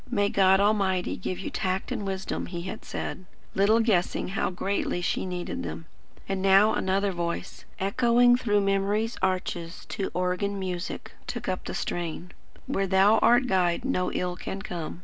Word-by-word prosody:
"May 205 -4 +2
God 190 -1 +4
Almighty 195 -3 +2
give 185 -1 -4
you - - -5
tact 190 -2 -2
and 200 - -3
wisdom," 190 0 -3
he 175 -1 -5
had 205 +4 -6
said, 185 - -5 0.3
little 205 +4 +4
guessing 205 -8 +1
how 190 - 0
greatly 190 0 -1
she 175 - -1
needed 180 -1 -4
them. 165 - -6 0.4
And 195 -1 -2
now 195 +3 +5
another 195 +1 +1
voice, 170 -1 -4
echoing 240 +5 +4
through 210 -5 +2
memory's 200 +3 +1
arches 180 -2 -2
to 195 - -2
organ 180 +3 0
music, 185 -2 -4 0.2
took - - -5
up - - -2
the - - -4
strain: 175 0 -4 0.3
"Where 195 0 -1
Thou 195 +3 +5
art 240 +3 +5
Guide, 180 -2 +1
no 180 -9 0
ill 180 -1 -2
can 195 +2 -6
come." 170 -4 -5
190 Hz, 165 wpm, -27 LUFS, 180-205 Hz, 0.4 s, now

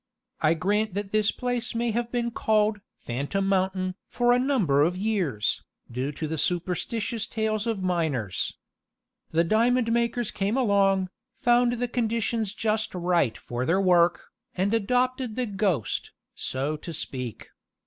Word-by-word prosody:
I 160 0 +3
grant 205 +4 0
that 200 -1 -3
this 215 -1 +3
place 245 -1 -3
may 235 0 +1
have 235 +1 -2
been 235 -1 -1
called 215 -2 +1 0.2
'Phantom 140 +11 -2
Mountain' 190 -1 +1
for 245 0 +3
a 245 - +3
number 225 - +2
of 175 +4 +2
years, 185 - 0 0.3
due 130 +4 -2
to 155 +2 -4
the 160 0 -3
superstitious 195 - -1
tales 220 0 -1
of 215 -5 -1
miners. 160 - -1 0.7
The 165 +1 +2
diamond 230 +5 +2
makers 235 0 0
came 200 +5 -1
along, 195 -5 +3 0.3
found 240 -1 +3
the 245 +1 -1
conditions 230 -3 -1
just 220 -2 -1
right 175 -9 +1
for 120 +1 -4
their 165 +8 +2
work, 175 -2 +3 0.3
and 195 +4 +1
adopted 250 +2 +1
the 255 - 0
ghost, 195 - -1 0.2
so 140 +4 -2
to 165 +2 -7
speak. 125 -7 -5
200 Hz, 145 wpm, -26 LUFS, 170-230 Hz, 0.7 s, I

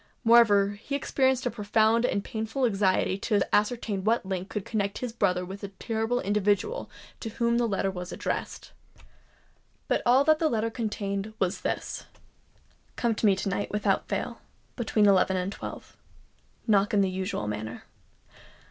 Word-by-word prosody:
Moreover, 225 -4 +6
he 280 - -3
experienced 265 -2 +1
a - - 0
profound 220 +2 +2
and 200 - -1
painful 225 +4 -2
anxiety 195 -3 +1
to 205 +1 +1
ascertain 210 -2 +1
what 225 0 +1
link 190 0 -4
could 210 -3 -4
connect 200 -2 -2
his 250 -3 -4
brother 180 -5 +1
with 195 +2 -8
the 200 - -4
terrible 225 +4 -2
individual 205 - 0 0.3
to 225 - -5
whom 235 +2 +1
the 240 - +2
letter 195 -2 0
was 180 -1 -6
addressed. - - -4 1.2
But - - +1
all 250 +3 +5
that 310 +1 +4
the 320 - +2
letter 225 -2 0
contained 210 -2 -3
was 185 +1 -1
this:— - - -3 0.9
"Come 235 -1 +1
to 215 - +1
me 195 - +5
to 190 - -2
night 200 +2 -2
without 210 0 0
fail, - - -3 0.3
between 220 -3 +2
eleven 190 -1 +4
and 185 +2 -2
twelve. - - -8 0.7
Knock 210 0 +3
in 200 - +4
the 195 - +3
usual 185 - -3
manner." 110 +2 -5
210 Hz, 160 wpm, -27 LUFS, 195-235 Hz, 1.2 s, Moreover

